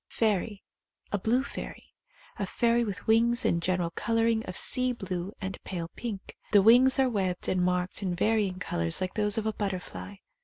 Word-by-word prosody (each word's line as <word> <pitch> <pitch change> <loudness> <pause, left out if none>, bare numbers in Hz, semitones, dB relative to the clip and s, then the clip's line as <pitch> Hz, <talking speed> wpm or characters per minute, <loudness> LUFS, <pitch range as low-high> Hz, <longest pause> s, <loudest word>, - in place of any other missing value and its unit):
Fairy. 210 -2 -1 0.5
A 205 - 0
blue 240 +7 +1
fairy. 280 - -9 0.5
A - - -2
fairy 235 0 +1
with 205 -4 -5
wings 235 +2 +3
and 170 - +1
general 180 -1 0
colouring 230 +2 0
of 185 - -3
sea 255 0 +3
blue 185 -4 -5
and 190 -1 -6
pale 170 -3 -5
pink. 215 -5 -6 0.2
The 200 -2 +6
wings 250 +5 +6
are 265 -1 +3
webbed 190 -6 -2
and 185 - +1
marked 180 +2 -1
in 185 -3 -2
varying 205 -1 +1
colours 85 - 0
like 185 0 -3
those 210 -1 +1
of 220 - -1
a 220 - 0
butterfly. 180 - -5
205 Hz, 180 wpm, -28 LUFS, 180-230 Hz, 0.5 s, The